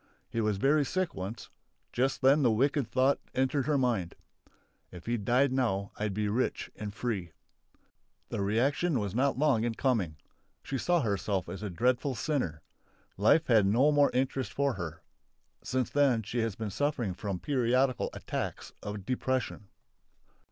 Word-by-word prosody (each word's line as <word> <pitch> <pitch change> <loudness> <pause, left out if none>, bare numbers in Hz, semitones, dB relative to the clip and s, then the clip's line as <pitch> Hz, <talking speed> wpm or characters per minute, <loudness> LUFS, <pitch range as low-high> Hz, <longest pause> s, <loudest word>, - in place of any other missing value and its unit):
He 115 - -1
was 105 -2 +1
very 145 +7 +3
sick 185 +4 -1
once; 95 +5 -6 0.4
just 135 +2 0
then 140 +3 +6
the 125 - +4
wicked 135 +3 +1
thought 130 +3 +2 0.2
entered 130 +1 +1
her 150 -2 +3
mind: 115 -10 0 0.7
"If 90 -2 -11
he 120 - 0
died 125 +5 +2
now 105 -7 0
I'd 105 -2 -2
be 105 0 0
rich 115 +5 -1
and 105 -1 -5
free!" 100 -7 -3 1.0
The - - -2
reaction 130 - +1
was 100 -3 -3
not 135 +4 +1
long 135 -6 +3
in 115 -1 -1
coming. 105 - 0 0.5
She 135 - -3
saw 175 +3 +2
herself 100 - -1
as 95 - -6
a 105 - -3
dreadful 125 +7 +1
sinner. 100 - -2 0.5
Life 130 +11 +4
had 110 -5 +4
no 125 +9 +4
more 145 -1 +4
interest 130 -2 -1
for 140 +1 +1
her. 85 -4 -6 0.6
Since 130 -1 -1
then 135 -6 +3
she 115 +4 -3
has 115 -3 -1
been 110 -2 -4
suffering 125 -4 -1
from 100 0 -4
periodical 130 +2 +1
attacks - - -5
of 105 -2 -6
depression. 130 -4 -2
120 Hz, 160 wpm, -30 LUFS, 105-135 Hz, 1.0 s, then